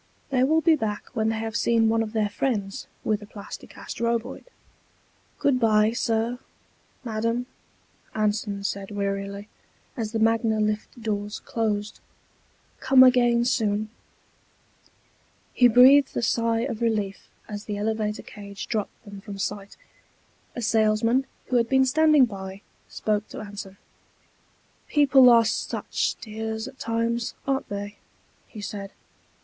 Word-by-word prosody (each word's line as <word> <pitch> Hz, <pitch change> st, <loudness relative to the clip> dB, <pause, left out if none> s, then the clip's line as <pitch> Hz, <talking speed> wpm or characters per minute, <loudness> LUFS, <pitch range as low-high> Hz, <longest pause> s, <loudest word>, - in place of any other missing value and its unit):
They 255 Hz, -2 st, +3 dB
will 315 Hz, +4 st, +3 dB
be 320 Hz, 0 st, +5 dB
back 215 Hz, -6 st, -3 dB
when 220 Hz, -2 st, 0 dB
they 225 Hz, -, -1 dB
have 225 Hz, -1 st, -4 dB
seen 230 Hz, -1 st, +3 dB
one 225 Hz, 0 st, +2 dB
of 220 Hz, 0 st, -4 dB
their 215 Hz, -2 st, +1 dB
friends 205 Hz, -3 st, -2 dB, 0.2 s
with 215 Hz, -1 st, 0 dB
a 210 Hz, -, -11 dB
Plasti 205 Hz, -1 st, -10 dB
Cast -, -, -9 dB
Roboid._ 235 Hz, +1 st, -2 dB, 0.9 s
"Good 270 Hz, -3 st, +2 dB
bye, 215 Hz, -2 st, +4 dB
Sir; 230 Hz, +1 st, -1 dB, 0.6 s
Madam," 230 Hz, +1 st, -1 dB, 0.7 s
Anson 210 Hz, -1 st, -1 dB
said 200 Hz, -1 st, -3 dB
wearily, 200 Hz, 0 st, -3 dB, 0.5 s
as 225 Hz, -5 st, -3 dB
the 225 Hz, -, -1 dB
Magna 225 Hz, 0 st, +2 dB
lift 215 Hz, +3 st, -2 dB
doors 210 Hz, -2 st, -3 dB
closed. 215 Hz, -2 st, -2 dB, 0.8 s
"Come 260 Hz, -1 st, +6 dB
again 240 Hz, -2 st, +4 dB
soon." 215 Hz, -3 st, 0 dB, 1.6 s
He 245 Hz, -, +6 dB
breathed 260 Hz, +4 st, +6 dB
a -, -, -1 dB
sigh 230 Hz, 0 st, +1 dB
of 235 Hz, -3 st, -3 dB
relief 210 Hz, -4 st, -1 dB, 0.2 s
as 205 Hz, 0 st, -7 dB
the 205 Hz, -1 st, -4 dB
elevator 215 Hz, 0 st, -2 dB
cage 200 Hz, -1 st, -9 dB
dropped 215 Hz, -3 st, -4 dB
them 200 Hz, -1 st, -10 dB
from 200 Hz, -1 st, -8 dB
sight. 200 Hz, 0 st, -5 dB, 0.8 s
A 240 Hz, -, -4 dB
salesman, 225 Hz, +4 st, +2 dB, 0.2 s
who 250 Hz, -, +3 dB
had 230 Hz, -1 st, +1 dB
been 265 Hz, 0 st, +4 dB
standing 300 Hz, 0 st, +5 dB
by, 195 Hz, -2 st, -8 dB, 0.3 s
spoke 210 Hz, -1 st, -2 dB
to -, -, -8 dB
Anson. 200 Hz, -2 st, -8 dB, 1.1 s
"People 275 Hz, -4 st, +6 dB
are 230 Hz, -1 st, +6 dB
such 220 Hz, -, -1 dB
dears 220 Hz, +1 st, -5 dB
at 270 Hz, -1 st, -12 dB
times, 230 Hz, 0 st, -1 dB
aren't 270 Hz, -1 st, -1 dB
they?" 205 Hz, +1 st, -5 dB, 0.5 s
he 215 Hz, -, -10 dB
said. 200 Hz, -1 st, -6 dB
220 Hz, 135 wpm, -25 LUFS, 210-240 Hz, 1.6 s, Come